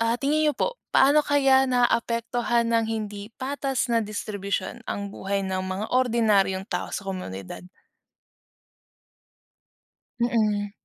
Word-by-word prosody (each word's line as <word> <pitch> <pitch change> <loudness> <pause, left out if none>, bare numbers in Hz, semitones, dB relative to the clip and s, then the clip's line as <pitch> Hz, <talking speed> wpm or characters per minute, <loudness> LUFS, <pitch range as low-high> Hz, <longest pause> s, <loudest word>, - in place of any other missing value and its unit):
ah, 230 +1 +2
tingin 300 +4 +1
nyo 295 - 0
po, - - -1 0.2
paano 285 +3 +6
kaya 270 -2 +4
naaapektuhan 235 -1 +1
ng 230 -1 +2
hindi 210 -2 -4
patas 270 -1 -2
na 230 - +3
distribusyon 205 0 -4
ang 200 0 -3
buhay 195 0 -2
ng 190 0 -2
mga 190 +3 -3
ordinaryong 220 -6 +2
tao - - -3
sa 200 - -4
komunidad? 100 - -6 2.6
Mm. 215 -4 +1
230 Hz, 115 wpm, -25 LUFS, 200-255 Hz, 2.6 s, paano